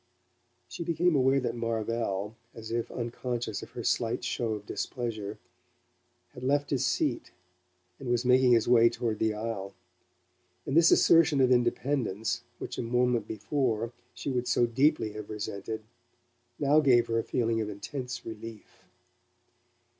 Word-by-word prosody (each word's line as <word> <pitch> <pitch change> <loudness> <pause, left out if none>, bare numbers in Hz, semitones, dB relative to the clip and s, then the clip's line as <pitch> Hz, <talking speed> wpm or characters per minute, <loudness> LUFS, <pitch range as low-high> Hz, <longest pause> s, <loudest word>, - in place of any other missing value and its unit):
She 170 - -6
became 170 0 +2
aware 135 0 +4
that 125 -3 -2
Marvell, 115 -3 -2 0.2
as 110 -1 -8
if 115 0 -1
unconscious 120 -2 -3
of - - -9
her - - -5
slight - - 0
show 115 -2 -1
of 105 -1 -6
displeasure, 110 -4 -4 1.0
had 125 - -10
left 140 +2 +1
his 135 -4 +1
seat, - - 0 0.7
and 130 - -6
was 120 0 +1
making 125 0 +5
his 115 -2 +3
way 115 -1 +6
toward 115 -2 -3
the 110 -1 +1
aisle; 105 -3 -4 0.9
and 135 - -2
this 165 0 +7
assertion 160 -4 +5
of 130 -1 +4
independence, 120 -3 0 0.2
which - - -6
a - - +1
moment 120 -2 +1
before 115 0 -1 0.2
she 125 +3 -4
would 125 -1 -1
so 120 0 +3
deeply 130 -1 +2
have 105 -1 -8
resented, 105 +1 -5 0.7
now 145 +1 +4
gave 125 -5 +5
her 115 0 0
a - - -1
feeling 115 -1 0
of 105 - -3
intense 125 +4 -6
relief. 110 -1 -10
120 Hz, 145 wpm, -29 LUFS, 110-130 Hz, 1.0 s, this